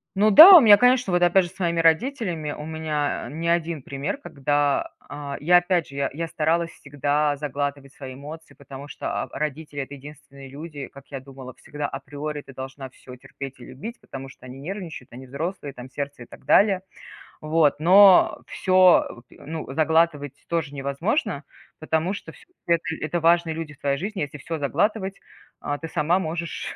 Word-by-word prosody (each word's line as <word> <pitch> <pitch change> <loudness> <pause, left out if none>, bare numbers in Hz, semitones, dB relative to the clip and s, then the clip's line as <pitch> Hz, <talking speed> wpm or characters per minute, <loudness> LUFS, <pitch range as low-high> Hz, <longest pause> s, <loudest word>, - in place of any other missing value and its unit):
Но 210 +3 +4
да, 325 - +11
у 335 - +10
меня 210 -3 +8
конечно 250 -3 +3
вот 175 - +2
опять 175 +1 +4
же 175 - -8
с - - -22
момим 170 -2 0
родителями 165 - 0
у 150 - -7
меня 155 -2 -3
не 165 +3 -3
1 170 -2 0
пример, 140 - -4
когда, 145 - -1 0.2
а, 145 -1 -6
я 175 +4 +5
опять 175 -2 +1
же, 140 - -12 0.2
я 165 +3 -4
старалась 165 +2 0
всегда 145 +1 -1
заглатывать 140 -1 -4
свои 130 -2 -9
эмоции, 150 +4 -11
потому 140 0 -11
что, - - -7 0.2
а, - - -7
родители 150 0 -4
это 140 +1 -8
единственные 140 -1 -13
люди, 145 0 -8
как 140 0 -16
я 135 - -7
думала 130 -1 -11
всегда 145 0 -6
априори 145 +1 -6
ты 135 - -14
должна 130 +1 -8
всё 125 0 -13
терпеть 135 +1 -10
и 120 - -11
любить, 225 - -9
потому 135 0 -9
что 130 - -16
они 130 +1 -10
нервничают. 165 - -7
Они 130 +2 -10
взрослые 145 +1 -5
там 125 +1 -11
сердце 140 -2 -6
и - - -13
так - - -15
далее. 195 +4 +4 0.6
Вот 155 -2 +2
но 190 +3 +6
всё, 185 -9 +3
ну 155 -1 -8
заглатывать 155 -2 0
тоже 160 -4 -2
невозможно, 145 - -2 0.4
потому 160 +3 -1
что 180 - -9
вс - - -19 0.2
это 170 -1 +2 0.2
это 165 +3 -2
важные 165 0 +3
люди 160 -2 -6
в - - -26
твоей 140 -1 -1
жизни. 200 +3 -5
Если 145 +1 -6
всё 160 +3 -5
заглатывать, 190 +7 -1 0.4
а, 145 - -3
ты 165 - -7
сама 165 +2 +1
можешь 170 -1 -4
155 Hz, 180 wpm, -23 LUFS, 140-170 Hz, 0.6 s, да